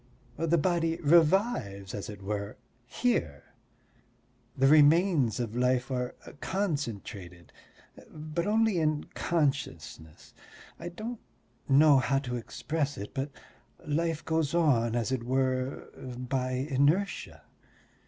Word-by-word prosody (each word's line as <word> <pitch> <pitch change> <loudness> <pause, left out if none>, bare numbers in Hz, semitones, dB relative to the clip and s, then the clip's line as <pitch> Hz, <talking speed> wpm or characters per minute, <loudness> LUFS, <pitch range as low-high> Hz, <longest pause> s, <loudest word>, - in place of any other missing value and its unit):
The 165 +1 +2
body 165 0 +1
revives, 155 - +2
as 100 - -5
it 100 -2 -9
were, 100 0 -4 0.3
here, 115 - -2 1.0
the 135 - +3
remains 150 - +5
of 115 -2 -3
life 125 +1 +1
are 125 -1 -2 0.2
concentrated, 115 - -4 0.6
but 155 +3 -4
only 220 -3 +2
in 155 -1 +1
consciousness. 80 - -3 0.5
I 175 - -5
don't 220 +6 -6 0.5
know 140 0 +6
how 135 +2 +1
to 125 -3 -3
express 145 +5 -3
it, 100 - -7
but 135 +1 -2 0.6
life 160 +1 -1
goes 160 -1 0
on, 120 -9 +2
as 120 +1 -1
it 130 -3 -1
were, 130 +1 -1 0.2
by 125 +1 -3
inertia. 140 +9 0
140 Hz, 110 wpm, -29 LUFS, 120-165 Hz, 1.0 s, know